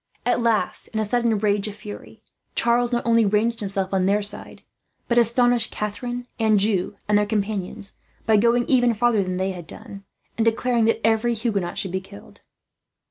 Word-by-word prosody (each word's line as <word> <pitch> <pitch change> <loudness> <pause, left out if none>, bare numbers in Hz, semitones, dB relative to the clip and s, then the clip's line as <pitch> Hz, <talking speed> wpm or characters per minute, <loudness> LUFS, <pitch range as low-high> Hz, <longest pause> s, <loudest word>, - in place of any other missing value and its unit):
At 245 0 +2
last, 230 -2 0
in 220 - -4
a 215 - +1
sudden 235 +2 +1
access 205 -1 +1
of 205 - -7
fury, 210 +1 -11 0.3
Charles 240 +1 +2
not 240 -1 -1
only 230 -1 +4
ranged 215 +3 +1
himself 195 -2 -3
on 190 -1 +2
their 205 +1 +2
side, 205 +1 -3 0.4
but 240 0 +3
astonished 240 0 +3
Catharine, 240 +4 -4
Anjou, 210 -3 +2
and 205 0 +4
their 210 - +1
companions 205 -1 -3 0.3
by 220 -1 +4
going 235 +3 +3
even 245 -3 +3
farther 235 -1 +2
than 185 -1 -3
they 190 +1 -1
had 175 -3 -9
done, 200 -1 -10 0.4
and 225 - +2
declaring 230 0 +2
that 225 -1 +1
every 225 +1 +2
Huguenot 205 -6 -2
should 190 - -2
be 190 +1 -2
killed. 105 - -14
220 Hz, 180 wpm, -23 LUFS, 200-235 Hz, 0.4 s, only